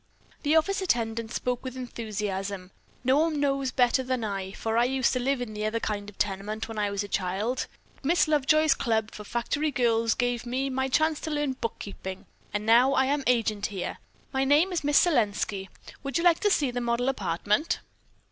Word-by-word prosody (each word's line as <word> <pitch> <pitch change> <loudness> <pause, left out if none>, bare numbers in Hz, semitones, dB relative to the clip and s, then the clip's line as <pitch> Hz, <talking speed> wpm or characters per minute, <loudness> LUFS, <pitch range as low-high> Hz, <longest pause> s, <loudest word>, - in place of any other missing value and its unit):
The 300 +1 +2
office 390 +5 +2
attendant 230 -8 -1
spoke 250 0 -2
with 260 -1 -6
enthusiasm. 205 -6 -4 0.3
"No 260 +3 +4
one 315 -2 +1
knows 275 -2 +1
better 255 0 +3
than 255 -2 -2
I, 195 -3 -3
for 225 +1 -2
I 235 +1 +4
used 260 0 +1
to 255 - 0
live 265 +1 0
in 225 -3 -5
the 210 0 -4
other 215 +2 0
kind 205 -2 -3
of 205 - -16
tenement 205 +2 -2
when 225 -1 -5
I 205 -1 +1
was 200 0 -2
a - - -6
child, 200 +6 -1 0.3
but - - -18
Miss 335 +3 +3
Lovejoy's 305 0 +4
club 220 -5 0
for 210 - -9
factory 240 +8 -1
girls 230 -4 +2
gave 245 -2 0
me 260 +3 -2
my 265 0 0
chance 310 +3 +2
to - - -5
learn 295 -3 0
bookkeeping, 200 -5 -6 0.3
and 210 0 -2
now 240 +4 +5
I 265 - +3
am 280 +1 0
agent 220 -4 +1
here. 195 -3 -5 0.3
My 265 0 +2
name 295 +7 +4
is 335 - -1
Miss 290 0 +3
Selenski. 210 - 0 0.3
Would 275 -2 -2
you 335 - 0
like 345 -2 +5
to 415 - +2
see 290 -9 +2
the 245 0 -3
model 240 +1 0
apartment?" 205 - 0
245 Hz, 200 wpm, -27 LUFS, 210-275 Hz, 0.3 s, now